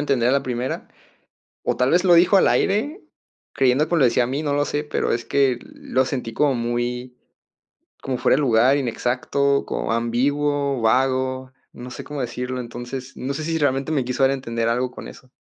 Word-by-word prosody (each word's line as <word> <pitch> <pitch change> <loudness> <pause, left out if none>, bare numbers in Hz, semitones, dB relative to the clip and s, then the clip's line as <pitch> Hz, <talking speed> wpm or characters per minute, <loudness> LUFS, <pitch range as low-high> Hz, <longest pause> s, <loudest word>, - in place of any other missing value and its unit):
entender 135 -5 +1
a - - +3
la 140 0 +2
primera. 125 0 -4 0.7
O - - -1
tal 125 +1 +2
vez 175 +1 +4
lo 175 -2 +6
dijo 180 +4 +5
al - - +5
aire, 255 - +1 0.5
creyendo 135 +3 +2
que 175 - 0
me 165 - +3
lo - - +5
decía 120 +1 +2
a - - -2
mí, 140 +4 -2
no 145 -2 -1
lo 145 0 +2
sé, 145 - -2
pero 150 - -1
es 115 0 -2
que, 135 -3 +2
lo 130 0 -2
sentí 125 -4 -4
como 145 -2 +2
muy 120 +1 -3 0.9
como 130 -2 -3
fuera - - +3
de 145 - +1
lugar, 125 +1 +4
inexacto, 140 +2 0
como - - -3
ambiguo, 140 +3 0
vago. 130 +2 +1 0.2
No 125 +1 -9
sé - - -7
cómo 145 -1 -7
decirlo, 125 +1 -4
entonces, 120 +2 -7
no 135 +2 -4
sé 155 - -4
si 165 +1 -1
realmente 140 -1 0
me 140 -4 +1
quiso 125 +2 -1
dar 135 - +5
a - - +1
entender 115 -3 -3
algo 125 +2 0
con - - -9
eso. 130 -1 -14
130 Hz, 205 wpm, -22 LUFS, 125-145 Hz, 0.9 s, lo